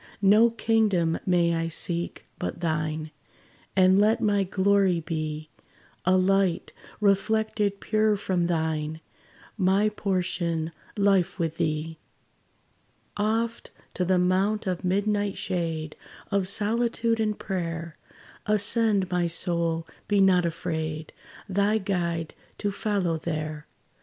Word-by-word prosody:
No 210 Hz, +4 st, +6 dB
kingdom 215 Hz, -8 st, +1 dB
may 170 Hz, -2 st, +3 dB
I 165 Hz, 0 st, -1 dB
seek, 170 Hz, +1 st, -3 dB
but -, -, -4 dB
thine; 155 Hz, -2 st, -2 dB, 0.6 s
And 190 Hz, 0 st, +5 dB
let 215 Hz, +3 st, +3 dB
my 205 Hz, -3 st, +2 dB
glory 190 Hz, -1 st, +2 dB
be 155 Hz, -1 st, -4 dB, 0.5 s
A 185 Hz, +1 st, +4 dB
light, 190 Hz, -1 st, +1 dB, 0.3 s
reflected 210 Hz, 0 st, +1 dB
pure 215 Hz, -1 st, +1 dB
from 180 Hz, -3 st, 0 dB
thine 160 Hz, -2 st, -1 dB, 0.6 s
My 195 Hz, +3 st, +3 dB
portion, 175 Hz, -5 st, -1 dB, 0.3 s
life 195 Hz, -4 st, +2 dB
with 165 Hz, -3 st, -2 dB
thee! 155 Hz, +1 st, -2 dB, 1.2 s
Oft 225 Hz, +3 st, -1 dB, 0.2 s
to 185 Hz, -, -1 dB
the 185 Hz, +1 st, +2 dB
mount 190 Hz, +4 st, +1 dB
of 185 Hz, -1 st, -2 dB
midnight 205 Hz, +2 st, 0 dB
shade, 165 Hz, -4 st, -3 dB, 0.4 s
Of 200 Hz, -2 st, +1 dB
solitude 230 Hz, +3 st, 0 dB
and 215 Hz, -1 st, 0 dB
prayer, 170 Hz, -3 st, -4 dB, 0.5 s
Ascend, 210 Hz, -2 st, +3 dB
my 175 Hz, -1 st, +1 dB
soul, 170 Hz, -1 st, 0 dB, 0.2 s
be 205 Hz, -1 st, +2 dB
not 185 Hz, -3 st, +4 dB
afraid 160 Hz, -1 st, -4 dB, 0.3 s
Thy 200 Hz, +2 st, +2 dB
Guide 170 Hz, -5 st, -2 dB, 0.2 s
to 205 Hz, -, -1 dB
follow 195 Hz, -5 st, -1 dB
there. 155 Hz, -2 st, -4 dB
185 Hz, 110 wpm, -26 LUFS, 165-205 Hz, 1.2 s, No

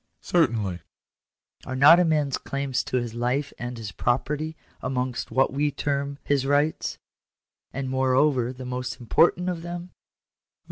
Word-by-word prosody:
" -, -, -50 dB
Certainly." 110 Hz, -, +2 dB, 0.4 s
" -, -, -28 dB
Are 130 Hz, -, -3 dB
not 150 Hz, +6 st, +8 dB
a -, -, +5 dB
man's 150 Hz, -5 st, +1 dB
claims 140 Hz, -2 st, -2 dB
to 130 Hz, -, -1 dB
his 120 Hz, -2 st, -3 dB
life 125 Hz, +4 st, -1 dB
and 120 Hz, 0 st, -5 dB
his 110 Hz, -2 st, -6 dB
property 150 Hz, +8 st, -1 dB, 0.2 s
amongst 125 Hz, -1 st, -2 dB
what 135 Hz, 0 st, +2 dB
we 145 Hz, +2 st, +1 dB
term 140 Hz, 0 st, -2 dB
his 140 Hz, -2 st, +1 dB
rights; 145 Hz, +3 st, +1 dB, 0.7 s
and 135 Hz, -1 st, -4 dB
moreover, 130 Hz, -1 st, +2 dB
the 130 Hz, 0 st, -9 dB
most 125 Hz, 0 st, -4 dB
important 170 Hz, +9 st, +3 dB
of 175 Hz, -2 st, -2 dB
them?" 175 Hz, +1 st, -6 dB
135 Hz, 150 wpm, -25 LUFS, 125-150 Hz, 0.7 s, not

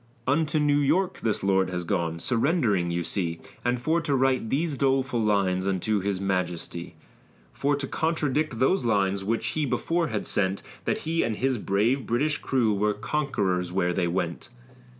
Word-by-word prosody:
Unto 150 Hz, +3 st, +1 dB
New 145 Hz, -1 st, +3 dB
York 175 Hz, +7 st, +1 dB
this 110 Hz, -4 st, -1 dB
lord 95 Hz, -1 st, +2 dB
has 90 Hz, -1 st, -3 dB
gone, 85 Hz, -2 st, -1 dB
surrendering 115 Hz, -, +1 dB
you 85 Hz, 0 st, -1 dB
see, 85 Hz, -2 st, -2 dB, 0.2 s
And 120 Hz, 0 st, +1 dB
for 160 Hz, +7 st, +1 dB
to 145 Hz, -3 st, 0 dB
write 130 Hz, -3 st, +1 dB
these 150 Hz, +3 st, 0 dB
doleful 135 Hz, -2 st, +1 dB
lines 100 Hz, -3 st, +1 dB
unto 100 Hz, +2 st, 0 dB
his 100 Hz, 0 st, -2 dB
majesty; 90 Hz, -3 st, -3 dB, 0.6 s
For 145 Hz, +1 st, +1 dB
to 140 Hz, -1 st, -3 dB
contradict 155 Hz, -3 st, 0 dB
those 130 Hz, +7 st, +2 dB
lines, 100 Hz, -4 st, +1 dB
which 115 Hz, +3 st, -1 dB
he 155 Hz, -, -1 dB
before 165 Hz, +5 st, 0 dB
had 110 Hz, -5 st, -3 dB
sent, 95 Hz, -1 st, 0 dB, 0.2 s
That -, -, +1 dB
he 165 Hz, +1 st, +1 dB
and 110 Hz, -, 0 dB
his 130 Hz, +1 st, 0 dB
brave 110 Hz, +8 st, +1 dB
British 145 Hz, +6 st, +1 dB
crew 120 Hz, -5 st, +1 dB
were 105 Hz, +1 st, +1 dB
conquerors 100 Hz, -, -1 dB
where 90 Hz, -1 st, +1 dB
they 90 Hz, -1 st, 0 dB
went. 85 Hz, +3 st, -3 dB
115 Hz, 170 wpm, -26 LUFS, 95-140 Hz, 0.6 s, New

